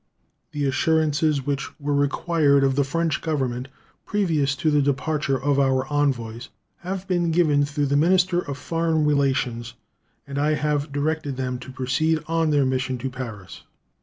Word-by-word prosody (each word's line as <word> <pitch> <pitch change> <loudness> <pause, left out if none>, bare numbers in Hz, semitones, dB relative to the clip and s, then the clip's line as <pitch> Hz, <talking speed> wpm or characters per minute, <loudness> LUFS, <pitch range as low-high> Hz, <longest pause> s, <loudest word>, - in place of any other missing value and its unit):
The 145 -1 -2
assurances 155 0 +1
which 140 +1 -3
were 145 0 -1
required 145 0 +2
of 135 -1 +2
the 140 - +3
French 160 +2 -1
Government 130 -5 -2 0.4
previous 160 -9 0
to 155 +3 0
the 150 -1 +3
departure 140 0 0
of 140 0 +1
our 130 -1 +2
envoys 120 -5 -1 0.3
have 190 +1 -5
been 175 -2 +1
given 155 -4 +3
through 145 0 -1
their 140 +1 +1
minister 180 +2 +3
of 140 -5 -5
foreign 165 +1 0
relations, 130 -5 0 0.5
and 140 0 -4
I 150 +1 +2
have 150 -1 -1
directed 145 -1 -2
them 125 -1 -3
to 130 - -9
proceed 130 +5 0
on 165 0 +1
their 145 -2 +3
mission 130 0 -1
to 130 +2 -4
Paris. 115 -7 -8
145 Hz, 160 wpm, -23 LUFS, 135-160 Hz, 0.5 s, the